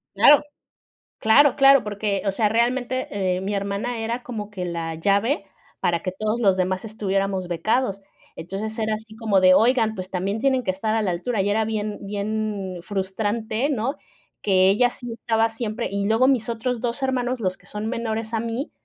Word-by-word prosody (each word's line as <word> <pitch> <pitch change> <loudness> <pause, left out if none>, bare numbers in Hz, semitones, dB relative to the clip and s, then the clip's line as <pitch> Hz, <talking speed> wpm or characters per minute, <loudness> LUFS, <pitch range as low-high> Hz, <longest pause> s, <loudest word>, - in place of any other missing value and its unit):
Claro. 290 - +7 0.8
Claro, 260 +5 +5
claro, 275 -1 +7
porque, 205 -1 -2
o 195 - +2
sea, 210 +1 +1
realmente, 245 +3 0
eh, 185 -2 -1
mi 200 +2 -3
hermana 200 +4 -2
era 235 +2 -3
como 215 -4 -6
que 185 -3 -4
la 165 -1 -3
llave 200 - +1 0.3
para 170 -1 0
que 185 - -3
todos 215 +4 -2
los 195 -5 +3
demás 185 +2 0
estuviéramos 195 -3 -2
becados. 195 +5 0 0.4
Entonces 195 +7 -5
era 220 -1 0
así 220 0 -9
como 220 -4 +2
de: 185 0 +7
"Oigan, 225 0 +3
pues, 185 -2 -7
también 195 +4 -2
tienen 260 0 +2
que 190 - -1
estar 215 +4 -1
a 225 - +2
la 185 -4 0
altura". 210 +5 -2
Y 195 - +1
era 220 +2 +2
bien 215 -1 -3
bien 200 -2 -3
frustrante, 215 +6 -2
¿no?, 265 +3 -1 0.5
que 190 -2 +4
ella 245 +5 +4
sí 245 -1 -8
estaba 225 0 +1
siempre 225 0 -4
y 200 0 -2
luego 225 +5 +3
mis 240 -4 +1
otros 235 +1 -2
2 240 +3 -3
hermanos, 255 -1 -1
los 185 -3 -1
que - - -26
son 210 +1 -6
menores 225 -1 -3
a 225 - +1
mí, 235 +6 -3
215 Hz, 190 wpm, -23 LUFS, 195-235 Hz, 0.8 s, Claro